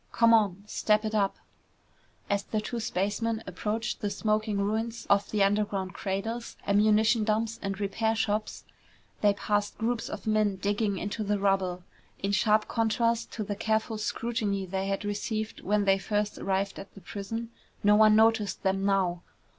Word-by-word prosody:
"Come 230 Hz, 0 st, +5 dB
on, 200 Hz, -4 st, +3 dB
step 210 Hz, +1 st, +1 dB
it 215 Hz, -, -2 dB
up!" 200 Hz, -2 st, +1 dB, 0.9 s
As 200 Hz, -1 st, +1 dB
the 215 Hz, -, -2 dB
two 230 Hz, +3 st, -4 dB
spacemen 220 Hz, +3 st, -1 dB
approached 210 Hz, +5 st, -3 dB
the 205 Hz, -, 0 dB
smoking 215 Hz, 0 st, 0 dB
ruins 220 Hz, +3 st, -2 dB
of 200 Hz, 0 st, +3 dB
the 210 Hz, -2 st, +2 dB
underground 195 Hz, -2 st, 0 dB
cradles, 225 Hz, +5 st, -4 dB
ammunition 215 Hz, +2 st, +4 dB
dumps, 220 Hz, +1 st, 0 dB
and 195 Hz, 0 st, -3 dB
repair 220 Hz, +3 st, 0 dB
shops, 215 Hz, -2 st, -1 dB, 0.6 s
they 205 Hz, -1 st, +4 dB
passed 205 Hz, 0 st, -1 dB
groups 230 Hz, +1 st, -1 dB
of -, -, -7 dB
men 215 Hz, -2 st, +2 dB
digging 205 Hz, +1 st, -1 dB
into 205 Hz, +4 st, -3 dB
the 205 Hz, 0 st, 0 dB
rubble. 190 Hz, -2 st, 0 dB, 0.3 s
In 195 Hz, -, -2 dB
sharp 215 Hz, +1 st, +3 dB
contrast 230 Hz, 0 st, 0 dB
to 215 Hz, -, -3 dB
the 205 Hz, 0 st, -3 dB
careful 220 Hz, +1 st, -1 dB
scrutiny 215 Hz, -3 st, -2 dB
they 190 Hz, +1 st, -3 dB
had 195 Hz, +1 st, -2 dB
received 215 Hz, +1 st, -3 dB
when 205 Hz, +1 st, +1 dB
they 195 Hz, 0 st, +4 dB
first 210 Hz, +1 st, -1 dB
arrived 195 Hz, 0 st, -1 dB
at 195 Hz, -, -11 dB
the 195 Hz, -, -12 dB
prison, 225 Hz, +5 st, -5 dB, 0.3 s
no 210 Hz, 0 st, +6 dB
one 215 Hz, 0 st, +6 dB
noticed 220 Hz, -1 st, +3 dB
them 195 Hz, 0 st, +1 dB
now. 190 Hz, -3 st, +1 dB
210 Hz, 160 wpm, -28 LUFS, 200-220 Hz, 0.9 s, no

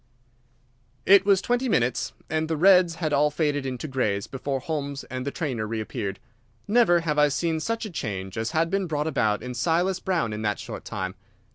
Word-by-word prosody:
It 195 Hz, 0 st, +6 dB
was 195 Hz, -2 st, +4 dB
twenty 245 Hz, +1 st, 0 dB
minutes, 125 Hz, -, +1 dB
and 160 Hz, 0 st, -1 dB
the 160 Hz, -1 st, -1 dB
reds 180 Hz, 0 st, +5 dB
had 155 Hz, -3 st, -2 dB
all 145 Hz, +1 st, +4 dB
faded 145 Hz, -2 st, -1 dB
into 130 Hz, +3 st, -4 dB
greys 105 Hz, -8 st, -1 dB
before 135 Hz, 0 st, -3 dB
Holmes 140 Hz, -1 st, -4 dB
and 130 Hz, +1 st, -4 dB
the -, -, -1 dB
trainer 130 Hz, -11 st, -3 dB
reappeared. 105 Hz, -3 st, -4 dB, 0.5 s
Never 200 Hz, -6 st, +4 dB
have 150 Hz, -2 st, 0 dB
I 150 Hz, -, +6 dB
seen 160 Hz, +3 st, -1 dB
such 230 Hz, +7 st, -2 dB
a 210 Hz, -, -6 dB
change 95 Hz, -, -4 dB
as 110 Hz, +1 st, -2 dB
had 165 Hz, +2 st, 0 dB
been 195 Hz, -1 st, 0 dB
brought 150 Hz, -2 st, -1 dB
about 120 Hz, -9 st, 0 dB
in 125 Hz, 0 st, -5 dB
Silas 175 Hz, +8 st, +1 dB
Brown 170 Hz, -, -1 dB
in 105 Hz, -, -4 dB
that 105 Hz, -2 st, 0 dB
short -, -, -8 dB
time. 95 Hz, 0 st, -4 dB
150 Hz, 190 wpm, -25 LUFS, 125-175 Hz, 0.5 s, It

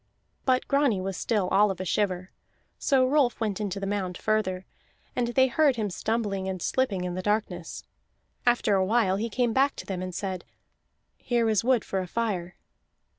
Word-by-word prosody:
But 255 Hz, -1 st, +2 dB
Grani 275 Hz, -8 st, +2 dB
was 190 Hz, 0 st, -3 dB
still 205 Hz, 0 st, 0 dB
all 205 Hz, +2 st, +4 dB
of 190 Hz, -2 st, -4 dB
a 185 Hz, -, -3 dB
shiver, 185 Hz, -1 st, -1 dB, 0.5 s
so 265 Hz, -3 st, +3 dB
Rolf 265 Hz, -3 st, +2 dB
went 215 Hz, -2 st, -1 dB
into 200 Hz, -1 st, -2 dB
the 195 Hz, -, -3 dB
mound 195 Hz, -3 st, -2 dB
further, 190 Hz, -4 st, 0 dB, 0.5 s
and 245 Hz, -1 st, +1 dB
they 260 Hz, +2 st, +4 dB
heard 275 Hz, +2 st, +3 dB
him 215 Hz, -4 st, -2 dB
stumbling 200 Hz, -2 st, -1 dB
and 185 Hz, -1 st, -3 dB
slipping 200 Hz, -2 st, 0 dB
in 180 Hz, -1 st, -3 dB
the 185 Hz, -, -3 dB
darkness. 195 Hz, -4 st, -2 dB, 0.6 s
After 240 Hz, -3 st, +3 dB
a 190 Hz, -1 st, +3 dB
while 195 Hz, -2 st, +2 dB
he 225 Hz, +3 st, -2 dB
came 240 Hz, +1 st, 0 dB
back 275 Hz, +3 st, +3 dB
to -, -, -8 dB
them 185 Hz, -2 st, -4 dB
and 185 Hz, -1 st, -5 dB
said: 190 Hz, -2 st, -3 dB, 0.8 s
"Here 235 Hz, -2 st, +1 dB
is 215 Hz, -2 st, +2 dB
wood 250 Hz, -2 st, +2 dB
for 195 Hz, -, -2 dB
a 185 Hz, -, -3 dB
fire." 190 Hz, -4 st, -2 dB
205 Hz, 185 wpm, -27 LUFS, 185-240 Hz, 0.8 s, all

